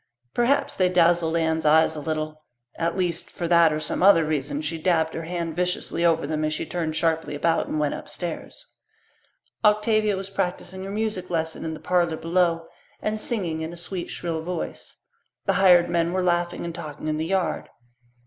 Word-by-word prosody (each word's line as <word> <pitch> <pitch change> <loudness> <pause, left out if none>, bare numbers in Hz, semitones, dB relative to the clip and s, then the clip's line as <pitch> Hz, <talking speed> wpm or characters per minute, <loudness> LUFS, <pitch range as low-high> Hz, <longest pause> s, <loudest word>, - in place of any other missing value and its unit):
Perhaps 245 +4 +2
they 185 -1 +2
dazzled 170 -2 +3
Anne's 160 -1 +1
eyes 160 +1 +4
a - - -4
little; 155 0 -3 0.3
at 170 +2 -1
least, 175 -2 -1
for 170 - -4
that 170 -1 +5
or 155 - -1
some 155 - -2
other 180 -4 +6
reason 145 -1 -1
she 160 +2 -3
dabbed 160 -1 +1
her 165 - -5
hand 170 -2 -3
viciously 180 -1 -1
over 165 -3 +3
them 155 +1 -2
as 155 0 0
she - - -3
turned 160 -2 -3
sharply 160 -2 0
about 165 +3 +1
and - - -2
went 150 -1 +1
upstairs. 170 - -6 1.0
Octavia 210 -1 +3
was 195 0 -6
practising 190 0 -3
her - - -6
music 210 -2 -2
lesson 160 -2 -2
in 160 -1 -3
the - - -10
parlour 175 -2 +1
below 165 -1 +1 0.3
and 215 0 -2
singing 180 -9 -2
in 160 +1 -4
a - - -9
sweet 175 +1 -5
shrill 165 -2 -3
voice. 175 +1 -6 0.4
The 195 - +2
hired 180 -2 +6
men 170 0 0
were 185 0 0
laughing 175 -1 0
and 170 - -4
talking 155 -3 -7
in 155 0 0
the 160 - -1
yard. 190 -1 -1
170 Hz, 185 wpm, -24 LUFS, 160-180 Hz, 1.0 s, other